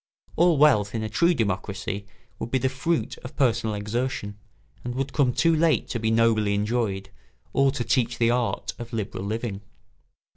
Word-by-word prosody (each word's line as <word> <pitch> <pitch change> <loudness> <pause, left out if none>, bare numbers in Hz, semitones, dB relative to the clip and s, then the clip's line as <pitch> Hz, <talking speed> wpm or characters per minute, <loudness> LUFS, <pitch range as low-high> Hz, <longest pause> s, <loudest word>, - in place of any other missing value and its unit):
All 170 -1 +4
wealth 115 -8 +4
in 110 - -1
a 110 - -3
true 170 +6 +3
democracy 100 -2 -2 0.3
would - - -4
be 130 - +2
the 130 +1 +1
fruit 155 +6 -2
of 130 +3 -10
personal 115 -5 +1
exertion 105 0 -3 0.5
and 120 0 -4
would 135 +1 -2
come 140 -5 +3
too 165 +6 +3
late 160 -1 +2
to 120 - -2
be 110 0 0
nobly 110 -2 +3
enjoyed 105 -2 -1 0.4
or 135 0 +4
to 130 -3 -2
teach 120 -1 +1
the 115 0 +3
art 120 -1 -1
of 120 0 -8
liberal 105 -3 -3
living. 110 -1 -3
115 Hz, 175 wpm, -25 LUFS, 105-130 Hz, 0.5 s, All